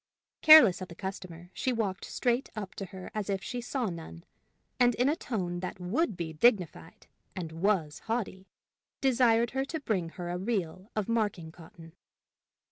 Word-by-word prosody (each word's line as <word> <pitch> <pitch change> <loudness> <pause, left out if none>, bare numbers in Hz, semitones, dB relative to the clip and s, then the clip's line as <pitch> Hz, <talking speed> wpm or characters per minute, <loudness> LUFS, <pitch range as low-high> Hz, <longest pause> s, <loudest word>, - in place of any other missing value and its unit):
Careless 255 - +9
of 185 - -5
the 170 - -11
customer, 180 -2 -7
she 260 - -1
walked 210 -6 -2
straight 245 +1 -1
up 205 -3 -6
to 195 - -6
her 185 0 -10
as 210 -2 -3
if 195 -1 -1
she 245 -1 -4
saw 250 +1 -2
none, 165 - -7 0.6
and 245 -2 +4
in 250 - +2
a 295 - +2
tone 180 - -3
that 185 +1 -6
would 205 - -1
be 160 -2 -4
dignified, 175 - +1 0.3
and 170 -4 -5
was 165 -3 0
haughty, 205 -4 -3 0.5
desired 235 -3 +3
her 265 +1 -1
to 320 +3 -4
bring 195 - -1
her 175 -1 -4
a 175 - -3
reel 190 -2 -3
of 215 -2 -1
marking 205 -8 -1
cotton. 165 0 -14
195 Hz, 170 wpm, -29 LUFS, 175-235 Hz, 0.6 s, Careless